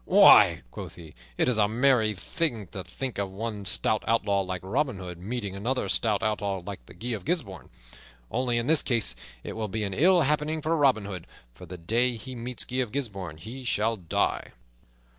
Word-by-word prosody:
"Why," - - +7
quoth - - -8
he, 80 -3 -12 0.2
"it - - +2
is 120 -3 +2
a 105 - +4
merry 115 -1 +3
thing 115 - -2
to 95 - -6
think 105 +6 -5
of 100 -1 -1
one 105 +1 -5
stout 105 +3 0
outlaw 105 -3 +2
like 95 -1 -4
Robin 130 +4 0
Hood 90 -2 -8
meeting 100 0 -4
another 120 +7 -1
stout 105 -3 +1
outlaw 100 -3 -1
like 95 -12 -8
Guy 120 - -7
of 110 -4 -3
Gisbourne. 130 - -3 0.6
Only 125 -1 0
in 115 - 0
this 155 +2 +5
case 115 -5 0 0.3
it - - -5
will 110 -1 -3
be 110 +2 -3
an 100 -2 -2
ill 175 - +5
happening 150 +2 +1
for 160 +2 +1
Robin 135 -9 +3
Hood, 95 -4 -7 0.3
for 90 +8 -12
the 90 +2 -8
day 115 +9 +1
he 115 +4 -8
meets 125 +1 -3
Guy 130 - -4
of 125 -4 0
Gisbourne 100 - -4
he 115 +11 -9
shall 115 -1 +1
die." 90 -6 -1
110 Hz, 195 wpm, -27 LUFS, 95-125 Hz, 0.6 s, Why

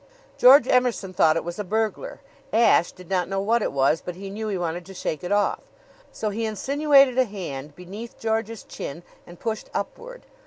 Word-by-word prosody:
George 260 0 +7
Emerson 245 -7 +1
thought 160 -2 +4
it 165 - -1
was 175 +3 -6
a - - -1
burglar. 220 - -2 0.3
Ashe 225 -6 +4
did 180 -1 -15
not 180 -1 -1
know 195 0 -1
what 225 +4 +1
it - - -1
was, 140 +3 +2
but 180 - -6
he 195 +1 -8
knew 215 +2 -4
he 200 -3 -2
wanted 175 0 -3
to 195 - -11
shake 155 -3 -4
it 180 - -4
off; 205 0 +2 0.5
so 215 -1 -3
he 225 +3 -3
insinuated 275 +3 +3
a 260 - +5
hand 150 - -7
beneath 200 +6 -9
George's 225 0 -2
chin 165 +5 -7 0.2
and 175 0 -13
pushed 220 -2 -4
upward. - - -5
205 Hz, 195 wpm, -24 LUFS, 180-230 Hz, 0.5 s, George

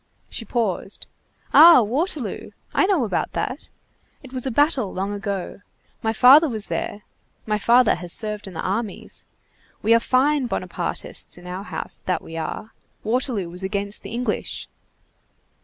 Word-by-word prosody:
She 225 - -4
paused. 210 -4 -2 0.5
"Ah! 325 -5 +9
Waterloo! 280 - -3 0.2
I 380 - +3
know 375 -9 +2
about 220 - -2
that. - - -3 0.5
It 265 -1 -12
was 255 0 -1
a - - +1
battle 265 - +2
long 195 +2 -3
ago. 200 -1 -4 0.4
My 220 - 0
father 270 +8 +7
was 215 -4 0
there. 205 - -3 0.4
My 210 -1 0
father 235 +3 +5
has 175 0 -4
served 210 0 -1
in 185 - -10
the - - -3
armies. 205 +3 -4 0.6
We 220 +2 +5
are 230 - +6
fine 265 +3 +2
Bonapartists - - -4
in 175 - -14
our 185 +2 -6
house, - - -6
that 185 - 0
we 165 - -9
are! 165 +7 -5 0.3
Waterloo 230 -4 -1
was 175 +2 -4
against 200 +1 -2
the - - -9
English." 245 +2 -3
220 Hz, 155 wpm, -23 LUFS, 200-255 Hz, 0.6 s, Ah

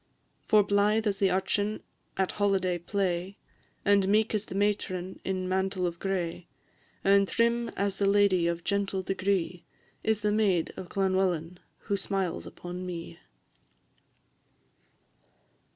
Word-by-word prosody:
For 210 -1 +6
blythe 205 +2 +2
as 200 -2 0
the 195 - +4
urchin 200 +3 0 0.3
at 190 -1 +1
holiday 190 -3 +1
play, 185 +1 -2 0.5
And 200 -1 +4
meek 215 +3 +3
as 215 -1 -1
the - - -7
matron 190 -2 -1
in 185 -1 -2
mantle 190 0 0
of 170 -1 -3
gray, 175 -3 -2 0.6
And 200 0 +5
trim 235 +1 +1
as 200 -1 0
the 200 - +2
lady 200 -4 +4
of 170 0 -2
gentle 200 -1 -1
degree, 185 -2 -1 0.4
Is 220 -1 +1
the 210 0 +1
maid 200 -6 +1
of 180 - -8
Llanwellyn 185 -3 +1 0.2
who 200 - -1
smiles 195 -2 -2
upon 180 +1 -7
me. 170 - -6
195 Hz, 130 wpm, -29 LUFS, 180-205 Hz, 0.6 s, For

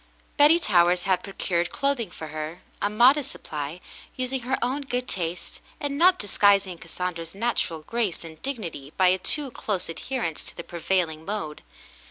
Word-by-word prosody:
Betty 300 +3 +7
Towers 180 - +3
had 185 -1 +2
procured 175 -3 -1
clothing 275 -7 0
for 160 -2 -8
her 155 +3 -5
— - - -31
a 205 - +2
modest 250 +6 +5
supply 150 +2 -6 0.2
— - - -19
using 255 +1 -1
her 260 +3 0
own 255 +4 0
good 250 -2 -2
taste, 175 -1 -4 0.2
and 285 -1 -2
not 360 +5 +6
disguising 200 - +3
Cas 165 - -12
sandra's 170 -1 -4
natural 200 -8 -1
grace 225 -3 -1
and 160 -1 -11
dignity 170 - -5
by 185 -1 +6
a 185 +1 +2
too 285 +7 +1
close 200 -6 -2
adherence 165 -2 -3
to - - -10
the 170 - -5
prevailing 170 -2 -1
mode. 175 -6 -4
190 Hz, 175 wpm, -26 LUFS, 165-250 Hz, 0.2 s, Betty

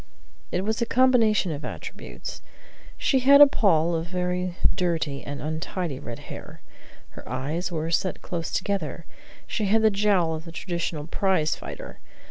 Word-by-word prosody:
It 180 - 0
was 220 +4 -1
a 235 - +1
combination 230 -7 +4
of 145 -1 -5
attributes. - - -7 0.6
She 265 - +2
had 280 +2 +7
a 290 - +12
poll 175 - +3
of 165 0 -1
very 180 0 -2 0.2
dirty 165 -6 -1
and 145 0 -5
untidy 160 -1 -3
red 120 -5 -7 0.2
hair; - - -10 0.5
her - - -12
eyes 145 +9 -2
were 165 0 -2
set 185 +2 0
close 165 -2 -3
together; 170 -6 -2 0.4
she 215 - -2
had 220 +3 +3
the 220 - +6
jowl 195 -5 +2
of 160 +1 -6
the 165 - -8
traditional 170 -3 -3
prize 175 -2 +1
fighter. - - -9
180 Hz, 155 wpm, -25 LUFS, 160-205 Hz, 0.6 s, a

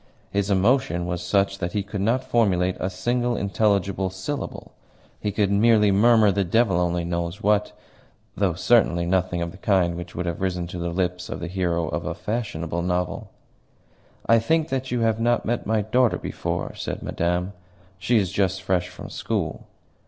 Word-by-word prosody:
His 100 0 0
emotion 100 -2 +2
was 90 0 -3
such 100 +2 +1
that 85 -1 -3
he 105 - 0
could 100 0 -5
not 120 +6 +1
formulate 95 -8 +2
a 95 - -1
single 120 +6 -1
intelligible 100 -1 +1
syllable; 95 +10 -5 0.5
he 105 - -2
could 100 -1 +1
merely 105 0 +4
murmur 110 +1 +5
the 100 +1 +1
devil 95 +1 +2
only 85 -1 0
knows 85 +4 -3
what, 105 0 +2 0.6
though 95 -4 +1
certainly 85 -4 +3
nothing 90 -1 0
of 85 - -4
the 95 - -14
kind 95 -5 +2
which 85 0 -8
would 90 - -3
have 85 -1 -3
risen 90 -2 -1
to 90 +1 -7
the 85 0 -2
lips 90 0 -2
of - - -5
the 85 - -4
hero 85 -2 -1
of - - -3
a - - -3
fashionable 85 -7 -3
novel. 90 0 -2 1.0
"I 115 +1 +5
think 160 +7 +1
that 130 -1 -2
you 125 -1 -1
have 110 -1 +1
not 120 +1 +1
met 120 -2 -2
my 110 -1 +1
daughter 120 +3 +2
before?" - - -4
said - - -5
Madame. 90 +3 -1 0.5
"She 115 +7 +2
is 95 -4 +1
just 95 -1 0
fresh 90 -1 0
from 90 - -9
school." - - -3
95 Hz, 180 wpm, -24 LUFS, 90-110 Hz, 1.0 s, murmur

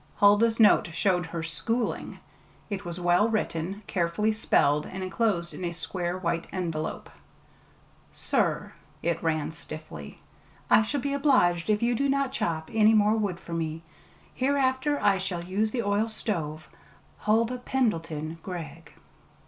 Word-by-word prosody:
Huldah's 215 +3 +4
note 215 -4 +6
showed 180 0 +1
her 165 0 -4
"schooling." 165 +10 -2 0.5
It 195 -2 -3
was 175 0 -5
well 175 +5 +3
written, 200 -2 -2
carefully 180 +5 0
spelled, 150 -8 +2
and 190 0 -6
enclosed 185 -3 0
in - - -7
a 170 - -1
square 175 +1 -3
white 170 -2 -2
envelope. 165 -4 -3 1.0
Sir - - -1 0.3
[it 170 -1 0
ran 160 -2 0
stiffly]: 155 - -8 0.5
I - - +8
shall 265 +5 -1
be 280 +1 -1
obliged 255 - +3
if 210 +1 +2
you 240 +1 +3
do 275 +4 +1
not 275 -1 +1
chop 160 -1 -2
any 220 0 +5
more 210 0 +4
wood 200 -5 -1
for 170 - -8
me. 165 -1 -3 0.5
Hereafter 270 +1 +1
I 195 -2 +3
shall 185 -3 -3
use 200 +5 0
the 235 +1 -2
oil 205 +2 +1
stove. 160 -9 -3 0.5
HULDAH 230 +4 +1
PENDLETON 165 - -1
GREGG. 165 -4 -8
185 Hz, 140 wpm, -27 LUFS, 165-220 Hz, 1.0 s, I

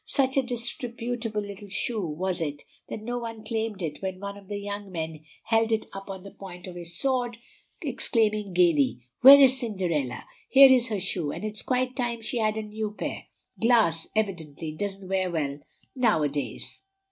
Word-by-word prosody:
Such 265 -1 +1
a 270 - +5
disreputable 240 -2 -3
little 200 0 -9
shoe 215 +1 -2
was 175 +3 -2
it 145 -2 -3 0.3
that 215 - -6
no 245 +2 -2
one 230 -2 -6
claimed 220 -3 -2
it 155 -3 -4
when 190 -1 -4
one 200 0 -5
of 200 -1 -14
the 205 0 -4
young 200 -1 -5
men 160 -2 -5 0.2
held 225 0 +2
it 220 -1 +1
up 195 0 -8
on 190 -1 -6
the 200 - -10
point 180 -2 -10
of 185 - -7
his 175 0 -4
sword, 250 -3 0 0.5
exclaiming 215 -4 +1
gayly, 160 -9 +3 0.2
"Where 275 +2 +11
is 265 -1 +6
Cinderella? 180 - -2 0.2
Here's 260 -2 +8
her 215 -4 -2
shoe, 170 -4 -1
and 210 - -5
it's 210 -1 -3
quite 255 0 0
time 235 -3 -2
she 220 +2 0
had 215 -1 +1
a 220 - -2
new 215 0 -4
pair. - - -4 0.4
Glass 225 -9 +3
evidently 165 -7 -2
doesn't 195 +3 -5
wear 190 -1 0
well 145 -4 -2 0.4
now 225 - +3
a 145 - +2
days." 135 -5 -5
205 Hz, 180 wpm, -27 LUFS, 175-230 Hz, 0.5 s, Where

